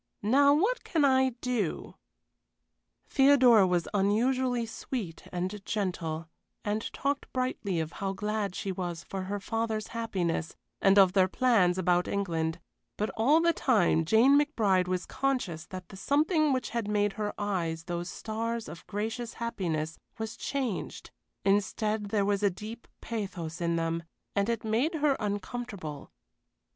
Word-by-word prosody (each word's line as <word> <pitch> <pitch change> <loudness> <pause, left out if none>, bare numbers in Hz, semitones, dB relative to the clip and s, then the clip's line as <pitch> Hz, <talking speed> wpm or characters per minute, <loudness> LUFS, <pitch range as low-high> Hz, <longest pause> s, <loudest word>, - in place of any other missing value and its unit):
"Now 280 +7 +5
what 430 +11 +1
can 315 -5 +2
I 265 -1 +4
do?" 235 -9 -2 1.1
Theodora 260 -7 +6
was 175 -2 +1
unusually 240 +5 +2
sweet 220 -6 -6
and 185 +3 -3
gentle, 170 -6 -2 0.4
and 210 +1 -2
talked 280 0 -2
brightly 255 -8 -1
of 160 0 -3
how 195 -1 -3
glad 210 -1 -2
she 195 - -3
was 175 -3 -4
for 190 -1 -5
her 200 +2 -3
father's 220 +1 -2
happiness, 185 -8 -2 0.3
and 195 +1 +5
of 190 -2 +7
their 190 -2 +5
plans 195 -5 +3
about 180 -1 +2
England; 165 -5 -1 0.4
but 210 - -1
all 285 +9 +4
the 335 0 +3
time 205 - +3
Jane 230 - +5
McBride 210 - +2
was 185 0 -1
conscious 245 -13 -2
that 185 -2 -8
the 195 - -10
something 305 - +2
which 255 -1 -1
had 230 -3 -2
made 205 -1 +1
her 210 -1 -2
eyes 170 -6 -2
those 175 0 -4
stars 230 +2 -3
of 165 +2 -10
gracious 225 +3 -3
happiness 165 -9 -3 0.2
was 220 0 -4
changed 260 -8 -3 0.3
instead 205 +2 +1
there 200 -1 +1
was 200 0 +1
a 205 - +4
deep 215 +5 -8
pathos 185 -7 -5
in 170 0 +1
them, 165 0 -1 0.3
and 200 +2 +1
it 230 -2 -1
made 235 +10 +1
her 295 -3 +2
uncomfortable. 205 - -4
205 Hz, 145 wpm, -29 LUFS, 180-240 Hz, 1.1 s, of